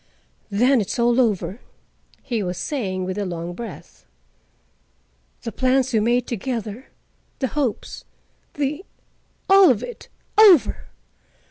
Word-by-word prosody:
"Then 245 Hz, +5 st, +3 dB
it's 200 Hz, -, -4 dB
all 240 Hz, +1 st, +3 dB
over," 200 Hz, -3 st, -1 dB, 0.6 s
he 235 Hz, -4 st, -2 dB
was 180 Hz, -2 st, -3 dB
saying 185 Hz, -, -3 dB
with 185 Hz, +2 st, -4 dB
a -, -, -1 dB
long 170 Hz, 0 st, -5 dB
breath. 220 Hz, -, -10 dB, 1.4 s
"The 230 Hz, -, -4 dB
plans 260 Hz, +2 st, +1 dB
we 220 Hz, -, +3 dB
made 240 Hz, +3 st, +1 dB
together, 230 Hz, 0 st, -5 dB, 0.5 s
the 265 Hz, -, -2 dB
hopes, 270 Hz, -6 st, -3 dB, 0.5 s
the—all 360 Hz, +5 st, +1 dB
of 240 Hz, -4 st, +1 dB
it—over! 425 Hz, -, +2 dB
235 Hz, 110 wpm, -22 LUFS, 200-265 Hz, 1.4 s, Then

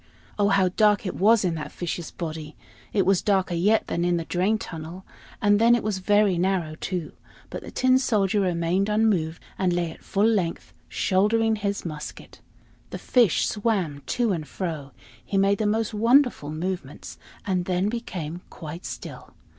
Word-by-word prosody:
Oh, 205 Hz, -, +4 dB
how 195 Hz, -2 st, +3 dB
dark 210 Hz, +3 st, +3 dB
it 185 Hz, -, -2 dB
was 215 Hz, +1 st, +4 dB
in 175 Hz, -, +1 dB
that 155 Hz, -2 st, -5 dB
fish's 175 Hz, -1 st, -4 dB
body! 155 Hz, -2 st, -6 dB, 0.4 s
It 195 Hz, -3 st, +2 dB
was 195 Hz, -1 st, +3 dB
darker 190 Hz, -3 st, +1 dB
yet 205 Hz, +6 st, +2 dB
than 170 Hz, -, -2 dB
in 175 Hz, 0 st, +2 dB
the 165 Hz, -, -3 dB
drain 190 Hz, +6 st, +1 dB
tunnel; 170 Hz, -2 st, -8 dB, 0.3 s
and 205 Hz, 0 st, +3 dB
then 235 Hz, +1 st, +6 dB
it 240 Hz, -, -2 dB
was 205 Hz, -2 st, -1 dB
very 205 Hz, -2 st, +3 dB
narrow 180 Hz, -4 st, 0 dB
too. 170 Hz, 0 st, -4 dB, 0.4 s
But -, -, -5 dB
the -, -, -9 dB
Tin 255 Hz, 0 st, +3 dB
Soldier 210 Hz, -6 st, +1 dB
remained 180 Hz, +2 st, 0 dB
unmoved, 205 Hz, -7 st, +1 dB, 0.2 s
and 185 Hz, -2 st, +2 dB
lay 175 Hz, -2 st, -1 dB
at -, -, -14 dB
full 200 Hz, +2 st, +1 dB
length 195 Hz, -7 st, 0 dB, 0.2 s
shouldering 220 Hz, +3 st, +2 dB
his 200 Hz, -2 st, -3 dB
musket. 150 Hz, -3 st, -8 dB, 0.5 s
The -, -, -5 dB
fish 235 Hz, -9 st, +3 dB
swam 195 Hz, -10 st, -1 dB
to 240 Hz, -3 st, +1 dB
and 160 Hz, -5 st, -3 dB
fro; 155 Hz, -7 st, -5 dB, 0.3 s
he 195 Hz, -, -2 dB
made 195 Hz, +1 st, +3 dB
the 215 Hz, -, +1 dB
most 220 Hz, +1 st, 0 dB
wonderful 235 Hz, -, +3 dB
movements, 160 Hz, -2 st, -5 dB, 0.3 s
and 185 Hz, -3 st, 0 dB
then 185 Hz, +1 st, 0 dB
became 180 Hz, -8 st, -5 dB
quite 165 Hz, +2 st, -8 dB
still. -, -, -9 dB
190 Hz, 170 wpm, -25 LUFS, 170-210 Hz, 0.5 s, then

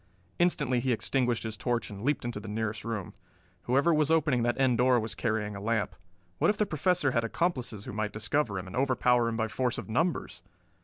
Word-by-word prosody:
Instantly 150 Hz, -8 st, +2 dB
he 130 Hz, +1 st, 0 dB
extinguished 120 Hz, 0 st, 0 dB
his 110 Hz, -1 st, -4 dB
torch 120 Hz, -1 st, -2 dB
and 100 Hz, -1 st, -8 dB
leaped 145 Hz, -1 st, 0 dB
into 120 Hz, -3 st, -3 dB
the 105 Hz, -, -9 dB
nearest 105 Hz, 0 st, -3 dB
room. 110 Hz, -5 st, -4 dB, 0.5 s
Whoever 140 Hz, +7 st, +3 dB
was 150 Hz, -1 st, +2 dB
opening 150 Hz, -6 st, +3 dB
that 120 Hz, +2 st, 0 dB
end 125 Hz, -3 st, +3 dB
door 125 Hz, 0 st, +4 dB
was 110 Hz, -1 st, -4 dB
carrying 110 Hz, -2 st, -2 dB
a 100 Hz, -, -7 dB
lamp. 110 Hz, -2 st, -1 dB, 0.4 s
What -, -, +4 dB
if 210 Hz, -, +1 dB
the 210 Hz, -, +2 dB
Professor 170 Hz, -2 st, +1 dB
had 115 Hz, -2 st, +1 dB
accomplices 120 Hz, -, -1 dB
who -, -, -6 dB
might 105 Hz, 0 st, -2 dB
discover 105 Hz, 0 st, -1 dB
him 95 Hz, -, -4 dB
and 95 Hz, -, -8 dB
overpower 125 Hz, -2 st, +2 dB
him 115 Hz, -, -3 dB
by 110 Hz, 0 st, 0 dB
force 125 Hz, +2 st, -1 dB
of -, -, -6 dB
numbers! 165 Hz, +10 st, -1 dB
120 Hz, 210 wpm, -29 LUFS, 110-140 Hz, 0.5 s, door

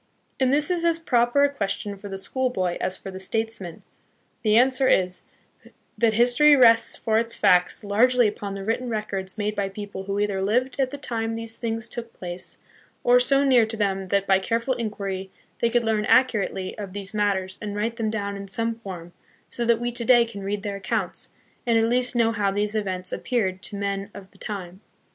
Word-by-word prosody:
And 260 Hz, -1 st, +3 dB
this 295 Hz, +4 st, +2 dB
is 345 Hz, -1 st, 0 dB
as 335 Hz, -1 st, +3 dB
proper 250 Hz, -3 st, +2 dB
a 285 Hz, 0 st, +2 dB
question 200 Hz, -3 st, -3 dB
for 200 Hz, +1 st, -10 dB
the 195 Hz, -, -5 dB
school 260 Hz, +6 st, 0 dB
boy 185 Hz, -7 st, -1 dB
as 185 Hz, -, -1 dB
for 195 Hz, -, -8 dB
the 190 Hz, -, -8 dB
statesman. 200 Hz, -3 st, -3 dB, 0.6 s
The 215 Hz, -1 st, +3 dB
answer 260 Hz, +2 st, +4 dB
is, 180 Hz, -1 st, +1 dB, 0.7 s
that 230 Hz, -2 st, +2 dB
history 245 Hz, +6 st, +5 dB
rests 235 Hz, -4 st, +5 dB
for 220 Hz, -1 st, +1 dB
its 230 Hz, 0 st, -1 dB
facts 180 Hz, +2 st, +3 dB
largely 240 Hz, +4 st, +3 dB
upon 205 Hz, -1 st, -5 dB
the 195 Hz, -, -6 dB
written 230 Hz, +4 st, -1 dB
records 210 Hz, -3 st, -4 dB
made 210 Hz, 0 st, -2 dB
by 200 Hz, -1 st, -1 dB
people 200 Hz, -1 st, -7 dB
who 200 Hz, 0 st, -2 dB
either 200 Hz, -2 st, 0 dB
lived 250 Hz, +7 st, 0 dB
at 265 Hz, -1 st, +2 dB
the 285 Hz, -, -7 dB
time 225 Hz, -4 st, -3 dB
these 225 Hz, 0 st, -5 dB
things 225 Hz, -1 st, -3 dB
took 235 Hz, -1 st, -7 dB
place, 175 Hz, 0 st, -6 dB, 0.5 s
or 245 Hz, 0 st, +6 dB
so 275 Hz, +2 st, +3 dB
near 250 Hz, -5 st, +4 dB
to 225 Hz, 0 st, -5 dB
them 195 Hz, -2 st, -1 dB
that, 200 Hz, +1 st, +1 dB
by 190 Hz, -1 st, +4 dB
careful 230 Hz, +6 st, 0 dB
inquiry, 200 Hz, -5 st, -4 dB, 0.3 s
they 235 Hz, -, +2 dB
could 240 Hz, 0 st, +2 dB
learn 220 Hz, -2 st, 0 dB
accurately 210 Hz, -7 st, +2 dB
of 195 Hz, -3 st, -6 dB
these 200 Hz, 0 st, -6 dB
mat 205 Hz, -1 st, +2 dB
ters 190 Hz, 0 st, -5 dB
and 205 Hz, -1 st, -4 dB
write 225 Hz, +3 st, -2 dB
them 225 Hz, -2 st, -1 dB
down 200 Hz, -2 st, -3 dB
in 200 Hz, 0 st, -7 dB
some 230 Hz, +4 st, -1 dB
form, 185 Hz, -6 st, -9 dB, 0.4 s
so 240 Hz, -, -2 dB
that 230 Hz, -1 st, +3 dB
we 240 Hz, 0 st, -2 dB
to 240 Hz, 0 st, -5 dB
day 240 Hz, -1 st, +5 dB
can 225 Hz, -3 st, -8 dB
read 200 Hz, +1 st, -3 dB
their 200 Hz, -2 st, -3 dB
accounts, 190 Hz, -, -2 dB, 0.4 s
and 230 Hz, -1 st, +4 dB
at 225 Hz, -, +3 dB
least 250 Hz, +1 st, +2 dB
know 230 Hz, -1 st, +3 dB
how 210 Hz, -3 st, 0 dB
these 205 Hz, +2 st, -1 dB
events 190 Hz, -4 st, -1 dB
appeared 190 Hz, -7 st, -1 dB
to 205 Hz, -, -7 dB
men 200 Hz, 0 st, -3 dB
of 195 Hz, -1 st, -11 dB
the 195 Hz, -, -22 dB
time. 190 Hz, -2 st, -6 dB
215 Hz, 210 wpm, -24 LUFS, 195-240 Hz, 0.7 s, or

